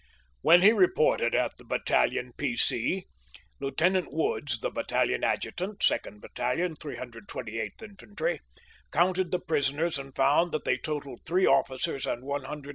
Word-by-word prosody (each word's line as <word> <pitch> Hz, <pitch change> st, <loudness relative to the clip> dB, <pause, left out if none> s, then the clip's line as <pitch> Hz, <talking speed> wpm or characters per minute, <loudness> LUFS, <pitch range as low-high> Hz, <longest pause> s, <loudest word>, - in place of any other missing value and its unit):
When 175 Hz, +3 st, +7 dB
he 210 Hz, -, +9 dB
reported 175 Hz, -, +3 dB
at -, -, 0 dB
the -, -, -15 dB
Battalion 125 Hz, -1 st, 0 dB
P. 130 Hz, -5 st, -1 dB
C, 150 Hz, +12 st, 0 dB, 0.5 s
Lieutenant 170 Hz, +7 st, +1 dB
Woods, 145 Hz, -5 st, -1 dB
the -, -, -2 dB
Battalion -, -, 0 dB
Adjutant, 195 Hz, +3 st, -1 dB
2nd 105 Hz, -, +1 dB
Battalion, 155 Hz, +8 st, -2 dB
328th 115 Hz, -, -6 dB
In 210 Hz, -2 st, -11 dB
fantry, -, -, -3 dB, 0.5 s
counted 180 Hz, +3 st, +2 dB
the 180 Hz, -, +1 dB
prisoners 155 Hz, -1 st, 0 dB
and 135 Hz, -1 st, -9 dB
found 145 Hz, +6 st, +3 dB
that 155 Hz, -, -2 dB
they -, -, +2 dB
totaled 145 Hz, -5 st, -5 dB
three 185 Hz, +2 st, +3 dB
officers 130 Hz, +1 st, +1 dB
and 120 Hz, -, -3 dB
129 140 Hz, +1 st, -2 dB
enlisted 145 Hz, +1 st, -7 dB
men. -, -, -8 dB
150 Hz, 150 wpm, -28 LUFS, 130-180 Hz, 0.5 s, he